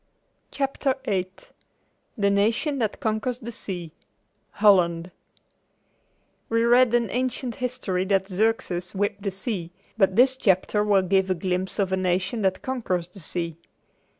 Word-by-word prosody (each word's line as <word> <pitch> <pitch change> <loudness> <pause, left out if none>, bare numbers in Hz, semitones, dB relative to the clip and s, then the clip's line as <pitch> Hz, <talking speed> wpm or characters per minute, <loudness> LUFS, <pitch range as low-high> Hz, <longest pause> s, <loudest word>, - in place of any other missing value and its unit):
CHAPTER 275 -1 -1
VIII 185 -2 0 0.9
THE 200 -2 +2
NATION 225 +8 +1
THAT 220 -3 -1
CONQUERS 220 +3 -1
THE 235 -1 -7
SEA 175 -7 -5 0.6
HOLLAND 180 -4 +3 1.4
We 230 0 +2
read 240 0 +5
in 235 -4 +1
ancient 250 0 -2
history 240 -7 -1
that 190 -1 +1
Xerxes 190 -3 -1
whipped 205 +1 -1
the 200 - -1
sea, 195 -3 -4 0.3
but 195 -2 +3
this 260 +3 +5
chapter 210 -1 +2
will 200 -2 +3
give 190 +1 +2
a 185 - +2
glimpse 185 +1 -2
of 195 -3 0
a 190 - +1
nation 185 +5 0
that 190 -1 0
conquers 185 -10 -2
the 195 - -13
sea. 170 -1 -3
200 Hz, 140 wpm, -25 LUFS, 185-235 Hz, 1.4 s, read